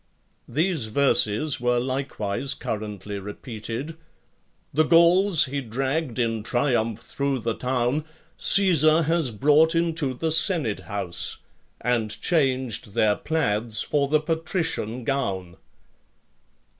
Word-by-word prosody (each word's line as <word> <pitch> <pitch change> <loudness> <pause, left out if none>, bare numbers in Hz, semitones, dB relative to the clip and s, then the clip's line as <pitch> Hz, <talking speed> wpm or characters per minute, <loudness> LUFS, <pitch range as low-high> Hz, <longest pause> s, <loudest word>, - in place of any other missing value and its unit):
These 160 -5 0
verses 130 +1 +1
were 125 0 +2
likewise 130 -2 -2
currently 105 -2 -5
repeated: 115 +8 -7 0.8
The 155 - +3
Gauls 170 +2 +5
he 140 +1 -3
dragged 135 +3 -2
in 115 -2 0
triumph 115 -1 0
through 140 -1 -2
the 115 +1 -1
town, 125 +4 -1 0.3
Caesar 165 -4 +4
has 165 -3 0
brought 150 - +3
into 165 -5 0
the 160 +5 -2
senate 160 - +3
house, 95 -4 -2 0.4
And 115 -3 -1
changed 130 - 0
their 105 -1 +3
plaids 110 -8 -1
for 140 -1 0
the 155 +2 +2
patrician 160 - -3
gown. 95 -10 -3
130 Hz, 105 wpm, -24 LUFS, 110-155 Hz, 0.8 s, Gauls